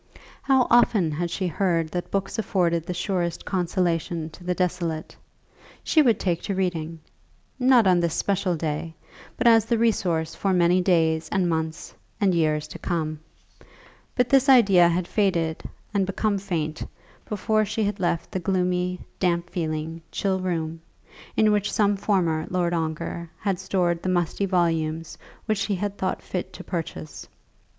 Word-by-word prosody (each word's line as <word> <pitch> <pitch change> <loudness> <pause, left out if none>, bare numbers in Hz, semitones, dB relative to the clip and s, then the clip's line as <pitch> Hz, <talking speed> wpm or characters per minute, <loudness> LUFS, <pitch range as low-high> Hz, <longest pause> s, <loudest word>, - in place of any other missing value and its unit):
How 265 -2 +3
often 215 -8 +4
had 170 +3 -2
she 185 +2 -2
heard 170 -2 0
that 175 +2 -4
books 195 +3 -2
afforded 170 -5 0
the 180 - -2
surest 175 -3 -2
consolation 170 -3 -1
to 175 - -14
the 180 0 -1
desolate. 175 -3 -2 0.7
She 315 - +4
would 235 -7 +3
take 175 -3 0
to 200 - -3
reading; 165 -3 -2 0.6
not 250 -3 +5
on 180 -2 +4
this 170 -2 0
special 195 -3 0
day, 160 +1 -3 0.4
but - - -2
as 225 -2 +6
the 235 0 +1
resource 175 -8 +1
for 195 -1 0
many 180 +1 +4
days 160 -3 +2
and 190 -3 +1
months, 160 -1 -3 0.3
and 200 -4 +3
years 155 -2 +1
to - - -9
come. 155 -3 -2 1.0
But 250 -1 +2
this 275 +2 +4
idea 200 -9 +7
had 175 +1 -1
faded 170 -6 0 0.3
and 195 -2 +1
become 200 +1 0
faint, 160 -5 -3 0.5
before 215 +1 +1
she 215 +1 -2
had 205 0 -2
left 170 -2 -1
the 185 - -2
gloomy, 180 0 0 0.2
damp 175 -1 0
feeling, 160 -2 -3
chill 190 -1 0
room, 165 -3 -3 0.6
in 215 -1 +4
which 205 -1 +1
some 205 -1 +2
former 175 -6 0
Lord 175 -1 0
Ongar 165 +1 -3
had 195 -3 -2
stored 180 -3 0
the 185 - -2
musty 180 +2 0
volumes 165 -3 0 0.3
which 215 -3 0
he 205 - -1
had 200 +2 -3
thought 185 - -2
fit 180 - -4
to - - -9
purchase. 165 -3 -6
180 Hz, 160 wpm, -24 LUFS, 165-195 Hz, 1.0 s, idea